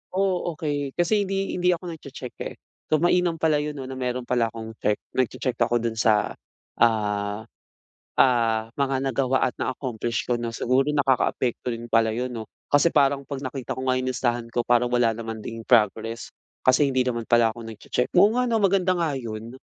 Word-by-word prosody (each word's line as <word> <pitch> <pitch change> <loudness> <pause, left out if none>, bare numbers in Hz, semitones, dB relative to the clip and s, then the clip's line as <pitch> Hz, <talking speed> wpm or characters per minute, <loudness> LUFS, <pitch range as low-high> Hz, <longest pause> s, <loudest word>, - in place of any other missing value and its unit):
Oh 185 -3 0
okey. 145 -3 -3
Kasi 195 +4 +2
hindi 195 0 -1
hindi 180 0 +3
ako 175 0 -7
nag-checheck 140 -5 -9
eh. - - -6 0.3
So - - +3
mainam 175 -1 +3
pala 155 -2 +2
'yon 150 0 -3
'no 135 - -6
na 130 0 -7
meron 125 0 -2
pala 120 -1 +1
akong 110 0 -7
check 105 - +2 0.2
nag-che-check 130 0 -1
ako 120 0 +2
do'n 115 -1 -2
sa, 110 -3 +3 0.5
ah 105 -2 +1 0.7
ah 115 -3 +3
mga 135 -1 0
nagawa 130 0 +1
at 125 - -1
na-accomplish 120 -3 -2
ko 120 - +1
no' 115 - -2
siguro 130 +5 +1
nakakaapekto 130 -3 +1
din 115 0 -4
pala 115 -1 +3
'yon 125 +3 -3
'no? 110 -2 -7 0.2
Kasi 145 +4 +5
parang 140 -3 +3
'pag 140 0 -6
nakita 130 -1 -5
ko 130 - -4
nga 130 - +2
'yong 130 - -2
listahan 120 -2 -1
ko 120 0 -1
parang 120 0 +3
wala 120 -2 +2
naman 115 0 -6
ding 115 0 -6
progress. 115 0 +1 0.3
Kasi 130 +3 +5
hindi 130 -1 +2
naman 120 -2 -2
pala 120 -1 +5
ako 120 - -10
nag-che-check. 115 +2 -3
Oo 205 +4 +6
nga 250 - +2
no, 230 - +2
maganda 190 -1 +3
nga 165 -4 0
'yon. 115 -1 -6
125 Hz, 190 wpm, -25 LUFS, 115-145 Hz, 0.7 s, Oo